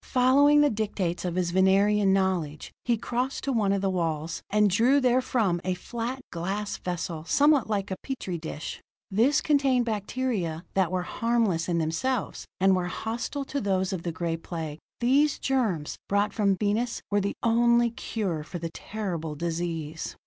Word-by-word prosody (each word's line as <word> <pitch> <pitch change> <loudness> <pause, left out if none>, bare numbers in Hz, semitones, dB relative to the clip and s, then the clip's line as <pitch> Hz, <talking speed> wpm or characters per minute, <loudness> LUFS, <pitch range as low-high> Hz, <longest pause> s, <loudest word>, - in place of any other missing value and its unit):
Following 280 +3 +5
the 295 - +4
dictates 200 -5 -2
of 175 -1 -2
his 180 -2 0
Venerian 195 +2 +4
knowledge, 185 -6 0
he 240 -2 +2
crossed 250 +4 -2
to 275 - -1
one 210 -4 +2
of 200 0 0
the 195 - +2
walls, 165 -2 -2
and 210 0 +4
drew 235 +9 +4
therefrom 245 -8 +2
a 185 0 -1
flat, 240 +7 -5
glass 195 +5 -3
vessel, 170 -3 -4
somewhat 290 - +3
like 200 -2 -1
a - - 0
petri 190 -10 -4
dish. 155 -1 -6 0.3
This 245 +9 +3
contained 275 -5 +2
bacteria 210 -6 -2
that 190 -3 +2
were 185 -1 0
harmless 215 -6 0
in 170 - +1
themselves, 180 +10 -1
and 190 0 +5
were 180 -1 -1
hostile 235 +8 -4
to 280 0 -3
those 190 -2 0
of 180 - -3
the 170 - -3
Gray 165 0 -2
Plague. 160 -2 -6 0.2
These 275 +5 +3
germs, 220 - -1
brought 200 +1 +1
from 200 -3 +2
Venus, 220 +4 -1
were 205 0 +3
the 200 +1 -2
only 235 0 +4
cure 200 -8 -3
for 175 - -7
the 165 -1 -5
terrible 170 -7 -4
disease. 165 -1 -3
200 Hz, 165 wpm, -27 LUFS, 175-240 Hz, 0.3 s, Following